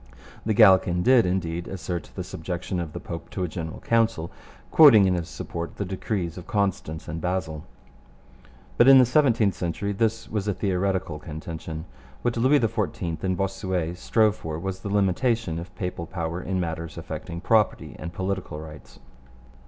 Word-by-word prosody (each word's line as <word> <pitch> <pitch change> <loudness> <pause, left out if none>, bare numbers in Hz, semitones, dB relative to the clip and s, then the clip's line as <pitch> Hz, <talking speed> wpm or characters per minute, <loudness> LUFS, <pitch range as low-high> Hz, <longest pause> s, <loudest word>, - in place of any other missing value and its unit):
The 110 - +2
Gallican 95 -4 +6
did, 125 -4 +5
indeed, 85 -2 -2
assert 90 -2 -5
the - - -3
subjection 90 +2 -4
of 85 -3 -4
the - - -5
Pope 85 - -7
to 95 - -3
a - - 0
General 80 -1 -6
Council, 115 -8 +1 0.4
quoting 125 -11 +8
in 95 - +3
his 85 -1 -3
support 85 0 -6
the 100 - -3
decrees 90 -2 -3
of 90 - -12
Constance 95 -5 -1
and 80 +1 -5
Basel. 80 -4 -2 1.1
But 120 - +7
in 135 0 +10
the 130 - +7
seventeenth 120 -6 +3
century 90 +4 -3
this 115 +2 0
was 105 -1 -3
a 100 - 0
theoretical 95 -4 -1
contention. 80 0 -7 0.4
What 120 - 0
Louis 130 +5 +4
XIV 105 -7 -2
and 95 -1 0
Bossuet 95 -3 -2
strove 110 +3 +2
for 80 -6 -5
was 95 +2 -4
the 100 - -6
limitation 100 -1 +1
of 85 +2 -10
papal 90 -3 -4
power 85 -1 -3
in 95 0 -2
matters 85 -1 -4
affecting 85 0 -6
property 110 +3 +1
and 85 - -5
political 95 -3 -3
rights. 75 -1 -11
95 Hz, 165 wpm, -25 LUFS, 85-105 Hz, 1.1 s, in